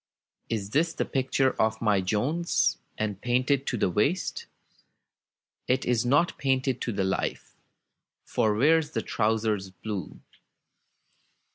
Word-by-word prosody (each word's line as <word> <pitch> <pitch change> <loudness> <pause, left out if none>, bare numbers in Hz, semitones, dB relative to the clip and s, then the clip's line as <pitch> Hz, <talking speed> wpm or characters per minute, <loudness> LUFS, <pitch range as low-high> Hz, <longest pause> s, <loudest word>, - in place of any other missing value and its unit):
It 105 0 -3
is 165 +2 +2
the - - -1
picture 135 0 +1
of 110 0 +1
my 105 -4 +2
Jones, 125 - 0 0.2
And 105 -2 -3
painted 130 +3 +1
to 125 - -1
the - - +2
waist. 140 - 0 1.2
It 130 +1 +1
is 120 -1 +1
not 145 +7 +2
painted 130 -2 0
to 120 - -1
the 100 -2 -1
life, 95 0 -2 0.7
For 110 -3 +1
Where's 155 +5 +3
the - - -1
trousers 110 -3 0
blue? 95 +1 -6
120 Hz, 125 wpm, -27 LUFS, 105-135 Hz, 1.2 s, Where's